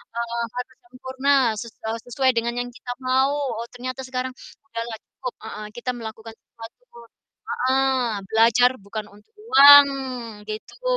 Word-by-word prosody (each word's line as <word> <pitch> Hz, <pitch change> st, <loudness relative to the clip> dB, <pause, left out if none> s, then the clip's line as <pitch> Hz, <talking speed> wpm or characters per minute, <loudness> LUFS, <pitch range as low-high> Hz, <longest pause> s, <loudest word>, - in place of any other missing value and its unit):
eee, 235 Hz, 0 st, -2 dB
harus 250 Hz, 0 st, -6 dB
sempurna, 260 Hz, +2 st, -1 dB, 0.3 s
se 235 Hz, -, -6 dB, 0.2 s
eee, 225 Hz, +1 st, -3 dB
sesuai 260 Hz, +1 st, +2 dB
dengan 235 Hz, 0 st, -1 dB
yang 245 Hz, 0 st, -3 dB
kita 245 Hz, 0 st, -8 dB
mau. 265 Hz, +2 st, +2 dB
Oh, 240 Hz, -5 st, -3 dB
ternyata 255 Hz, +1 st, -6 dB
sekarang 255 Hz, 0 st, -3 dB, 0.3 s
segala 230 Hz, -3 st, -6 dB
cukup, 255 Hz, -, -8 dB
heeh, 215 Hz, -1 st, -7 dB
kita 245 Hz, +1 st, -3 dB
melakukan 225 Hz, -2 st, -8 dB
sesuatu, 230 Hz, -, -14 dB, 0.6 s
heeh, 265 Hz, +1 st, +1 dB, 0.3 s
belajar 230 Hz, +3 st, +4 dB
bukan 210 Hz, 0 st, -7 dB
untuk 210 Hz, -, -22 dB, 0.2 s
uang, 285 Hz, -9 st, +10 dB, 0.6 s
gitu. 215 Hz, -, -8 dB
245 Hz, 135 wpm, -23 LUFS, 230-260 Hz, 0.6 s, uang